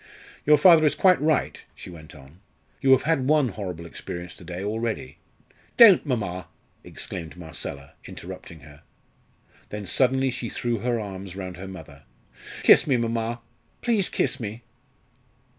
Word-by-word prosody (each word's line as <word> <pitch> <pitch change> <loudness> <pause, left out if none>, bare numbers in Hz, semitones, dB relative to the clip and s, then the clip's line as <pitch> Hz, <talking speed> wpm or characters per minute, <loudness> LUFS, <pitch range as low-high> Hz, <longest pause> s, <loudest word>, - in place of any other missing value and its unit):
"Your 150 0 +7
father 165 +1 +7
is - - +1
quite 185 -4 +4
right," 155 0 0
she - - -11
went 80 -2 -13
on. 70 +4 -16 0.4
"You 135 - +1
have 130 - +3
had 150 -5 +1
one 150 -3 +3
horrible 90 -5 -6
experience 85 +1 -8
to - - -15
day 90 +2 -6
already 110 - -4 0.3
" - - -33
"Don't, 225 -7 +8
mamma!" 100 -8 -3 0.4
exclaimed 85 -1 -7
Marcella, 75 -5 -7
interrupting 90 -3 -10
her. 75 0 -15 0.9
Then 105 -1 -6
suddenly 130 +6 +2
she 120 -1 -5
threw 120 -2 -2
her 120 +1 -1
arms 95 -3 -7
round 95 -2 -7
her 95 +2 -8
mother. 80 -7 -11 0.6
"Kiss - - +6
me, 135 -4 +3
mamma! 115 0 -2 0.4
please 225 -6 +1
kiss 140 - -1
me!" 115 +1 -6
105 Hz, 150 wpm, -25 LUFS, 90-130 Hz, 0.9 s, Don't